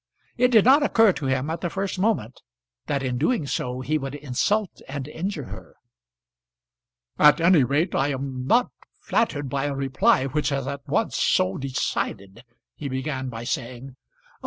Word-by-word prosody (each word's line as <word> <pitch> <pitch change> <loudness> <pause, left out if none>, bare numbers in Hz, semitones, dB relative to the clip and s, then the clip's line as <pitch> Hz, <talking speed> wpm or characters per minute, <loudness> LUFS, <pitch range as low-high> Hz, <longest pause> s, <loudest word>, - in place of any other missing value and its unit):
It 250 +1 +4
did 225 -5 +5
not 275 +4 +6
occur 225 -8 +4
to 140 - -4
him, 130 +3 0
at 165 - -4
the 175 - -1
first 195 +1 -3
moment, 185 - -1 0.5
that 140 -1 -1
in 125 -2 -2
doing 160 - +1
so 125 -2 -3
he 155 +4 0
would 135 0 -5
insult 150 +9 -1
and 135 0 -5
injure 165 +1 -4
her. - - -11 1.4
"At 150 +2 +6
any 165 -3 +5
rate 145 +8 0
I 135 - +1
am 130 -2 -4
not 245 - +3 0.3
flattered 145 -11 0
by 135 +2 -2
a 145 -1 -2
reply 135 -1 +2
which 145 +2 -1
is 135 -2 -1
at 140 +1 -6
once - - 0
so 95 +1 +2
decided," 115 -6 -3 0.3
he 145 - -5
began 130 0 -3
by 115 -1 -7
saying. 125 0 -4
"Oh! - - -36
140 Hz, 170 wpm, -24 LUFS, 130-175 Hz, 1.4 s, not